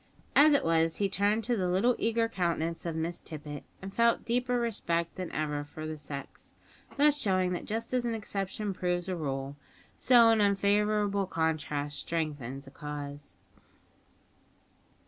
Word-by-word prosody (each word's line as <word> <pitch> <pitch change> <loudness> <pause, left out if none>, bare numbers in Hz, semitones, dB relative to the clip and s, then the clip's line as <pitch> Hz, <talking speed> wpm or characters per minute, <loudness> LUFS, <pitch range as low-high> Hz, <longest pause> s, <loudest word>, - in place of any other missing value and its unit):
As 295 +1 +7
it 285 - +2
was, 165 0 +2
he 200 - +1
turned 205 +3 +1
to 240 +2 +1
the 185 -4 0
little 205 +7 +3
eager 230 0 +1
countenance 170 -5 -1
of 165 - -2
Miss 165 +2 -2
Tippet, 150 -2 -7 0.2
and 195 0 -6
felt 235 +1 +3
deeper 245 +1 +1
respect 170 -8 -1
than 185 -2 -5
ever 150 -1 -2
for 155 +2 -8
the 155 0 -4
sex; 140 -1 -8 0.4
thus 295 +1 +4
showing 185 -5 +1
that 175 - -4
just 230 +3 -3
as 250 -1 +2
an 235 -1 -1
exception 200 -1 -3
proves 180 -1 -1
a 185 - -1
rule, 140 -3 -4 0.4
so 240 -2 +6
an 225 -1 +4
unfavourable 205 0 +2
contrast 150 -3 -1
strengthens 145 -5 -3
a 135 - -13
cause. 145 -1 -7
180 Hz, 155 wpm, -30 LUFS, 155-220 Hz, 0.4 s, As